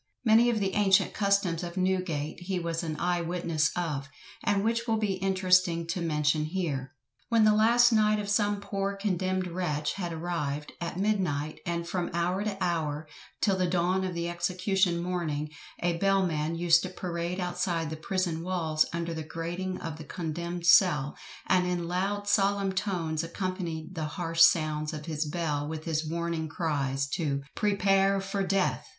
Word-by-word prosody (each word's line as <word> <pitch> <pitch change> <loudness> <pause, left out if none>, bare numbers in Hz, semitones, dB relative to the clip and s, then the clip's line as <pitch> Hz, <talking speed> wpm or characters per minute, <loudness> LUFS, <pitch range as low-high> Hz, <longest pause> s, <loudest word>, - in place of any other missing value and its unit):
Many 230 +2 +6
of 230 -2 +1
the 195 -2 -1
ancient 195 -2 +3
customs 200 -5 +1
of 175 0 -6
Newgate 185 -5 -1
he 185 +1 -3
was 170 -1 -2
an 160 -3 -3
eye 175 0 +1
witness 165 -2 0
of, 150 -5 -2 0.3
and 200 -1 +1
which 230 +2 0
will 225 -1 +2
be 210 -3 0
interesting 185 -3 +2
to 180 - -1
mention 150 -1 +1
here. 150 -6 -3 0.3
When 230 -2 +4
the 215 0 +6
last 235 +3 +5
night 215 -1 +4
of 205 -1 -3
some 205 0 +1
poor 200 0 -2
condemned 185 -2 -1
wretch 155 -4 -2
had 175 -3 -4
arrived, 155 -3 -3
at 170 0 -4
midnight, 180 -8 0
and 170 0 -2
from 175 -1 -2
hour 180 +3 0
to 210 -2 -3
hour, 155 -4 -1 0.3
till 200 -3 +3
the 185 -1 +1
dawn 180 +2 +1
of 185 -2 -3
the 170 0 -2
execution 180 0 0
morning, 155 -4 -2 0.3
a 170 -1 +1
bell 195 +1 +3
man 155 -1 -1
used 170 0 +4
to 185 - -4
parade 175 0 -4
outside 175 -3 -1
the - - -3
prison 170 0 -2
walls 165 -3 +1
under 170 0 -3
the 160 - -4
grating 175 +4 -4
of 160 -1 -6
the - - -7
condemned 170 +2 -4
cell, 170 -6 +5 0.3
and 180 -1 +3
in 175 -1 -1
loud 195 +3 -1
solemn 200 -1 +2
tones 170 -5 -1
accompanied 175 -1 -4
the 160 -3 -3
harsh 165 +1 -2
sounds 155 -2 +4
of 150 -1 -6
his 155 -1 -2
bell 150 -2 -2
with 155 0 -5
his 160 -1 -1
warning 170 -1 -2
cries, 140 -4 -1
to 140 -1 -2
"prepare 195 -1 +2
for 195 +1 -3
death." 195 0 0
175 Hz, 170 wpm, -28 LUFS, 160-195 Hz, 0.3 s, Many